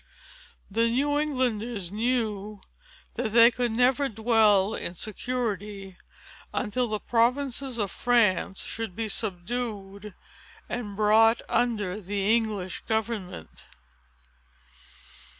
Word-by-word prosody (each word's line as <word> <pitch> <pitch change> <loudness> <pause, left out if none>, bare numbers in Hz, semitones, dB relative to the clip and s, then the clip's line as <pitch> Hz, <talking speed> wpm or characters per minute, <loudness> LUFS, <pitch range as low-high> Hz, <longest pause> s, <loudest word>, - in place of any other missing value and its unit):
The 230 +3 +2
New 290 +5 +1
Englanders 240 - -1
knew 215 -3 -2 0.6
that 220 - -2
they 235 +1 +8
could 245 -1 -1
never 255 +4 +2
dwell 220 -2 +3
in 175 - -4
security, 210 -3 -4 0.6
until 245 +4 -1
the 215 0 -2
provinces 255 +2 0
of 205 -4 -1
France 210 -5 +1
should 225 -5 -5
be 225 -1 -2
subdued, 205 0 -3 0.5
and 210 -5 -5
brought 220 +2 +4
under 210 -5 0
the 200 +3 +1
English 210 -5 -2
government. 220 - -4
220 Hz, 95 wpm, -27 LUFS, 200-240 Hz, 0.6 s, they